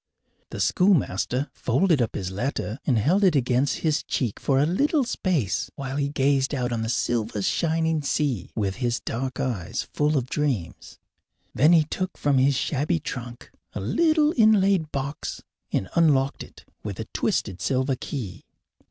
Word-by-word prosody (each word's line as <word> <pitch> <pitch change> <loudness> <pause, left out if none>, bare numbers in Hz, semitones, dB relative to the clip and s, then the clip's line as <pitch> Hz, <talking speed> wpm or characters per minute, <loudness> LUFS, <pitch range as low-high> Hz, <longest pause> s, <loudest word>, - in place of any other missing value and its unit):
The - - -7
schoolmaster 145 - +1
folded 150 +4 +2
up 115 - -1
his 95 -1 -3
letter 115 +2 -3
and 125 -5 +3
held 170 - +2
it 185 -5 +4
against 130 0 +1
his 155 -1 +2
cheek 120 -6 -2
for 135 - +1
a 140 - +4
little 280 - +2
space 175 - -1
while 135 -1 -5
he 140 -1 0
gazed 140 0 +1
out 125 -2 -1
on 115 -1 -1
the 110 - -2
silver 115 -4 -1
shining 160 - +1
sea 140 - -1
with 100 -3 -1
his 120 -2 -1
dark 130 +2 -4
eyes 105 -10 -3
full 150 0 +1
of 130 -2 -1
dreams. 130 - -3 0.6
Then 150 +5 +4
he 165 -2 +6
took 185 +5 -4
from 140 -2 +2
his 135 +1 +3
shabby 150 +5 0
trunk 120 -4 -7 0.2
a - - -4
little 310 - +2
inlaid 200 - +4
box 140 +1 -4 0.3
and 95 - -1
unlocked 140 -5 +2
it - - -12 0.2
with - - -5
a - - -3
twisted 95 - -1
silver 130 0 0
key. 120 -7 -6
135 Hz, 160 wpm, -25 LUFS, 120-160 Hz, 0.6 s, he